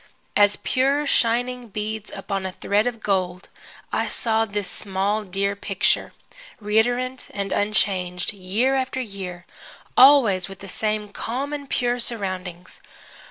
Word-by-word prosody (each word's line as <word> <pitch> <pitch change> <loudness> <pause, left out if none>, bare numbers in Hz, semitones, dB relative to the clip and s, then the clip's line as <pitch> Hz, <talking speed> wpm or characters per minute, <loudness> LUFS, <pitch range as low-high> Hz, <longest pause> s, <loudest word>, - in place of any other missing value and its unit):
As 205 0 +5
pure 275 +3 +1
shining 245 -1 +1
beads 215 0 -4
upon 195 0 -3
a 190 -1 -4
thread 205 +5 +1
of 230 -2 -3
gold 185 -2 -1 0.4
I - - +1
saw 225 -1 +1
this 205 -2 -3
small, 200 +2 -1
dear 200 +1 -1
picture, 195 -1 +1 0.5
reiterant 245 +5 +1
and 200 -1 -2
unchanged, 185 -2 0
year 205 +7 0
after 260 0 -1
year, 190 -6 -6 0.5
always 235 -10 +6
with 195 - -9
the 195 - -10
same 210 +1 -1
calm 260 +8 -4
and 285 -2 -5
pure 245 0 0
surroundings. 185 -6 -4
210 Hz, 130 wpm, -23 LUFS, 195-245 Hz, 0.5 s, always